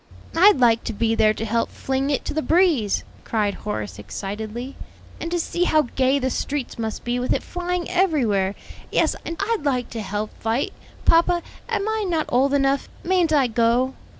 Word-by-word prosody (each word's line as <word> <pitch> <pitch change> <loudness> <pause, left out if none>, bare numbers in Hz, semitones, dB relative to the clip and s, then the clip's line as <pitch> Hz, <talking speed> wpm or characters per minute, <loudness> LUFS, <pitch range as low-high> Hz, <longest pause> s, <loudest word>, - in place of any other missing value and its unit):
"I'd 380 +1 +7
like 235 -3 +4
to 230 - -2
be 225 +2 +1
there 215 -1 +3
to 225 - -3
help 230 +1 0
fling 270 +1 -2
it 285 - -1
to - - -3
the 315 - 0
breeze," 320 - +2 0.2
cried 210 -3 0
Horace 105 - -5
excitedly; 215 - -6 0.4
"and 330 - -4
to 345 0 0
see 350 +2 0
how 310 -3 +4
gay 265 +1 +3
the 260 -1 -1
streets 275 -3 -3
must 220 -1 -3
be 240 +1 -1
with 250 - 0
it - - -3
flying 355 0 -3
everywhere. 245 - +1 0.4
Yes, - - +2
and 330 - -4
I'd 420 -2 0
like 255 -4 0
to 230 - -4
help 210 +1 -3
fight. 230 +4 -1 0.3
Papa, 340 +1 +4 0.3
am 395 - -1
I 440 0 0
not 320 -3 +1
old 270 +3 +3
enough? 275 0 +1
mayn't 355 -2 +2
I 285 -4 +4
go?" 240 +2 +2
260 Hz, 185 wpm, -23 LUFS, 225-330 Hz, 0.4 s, I'd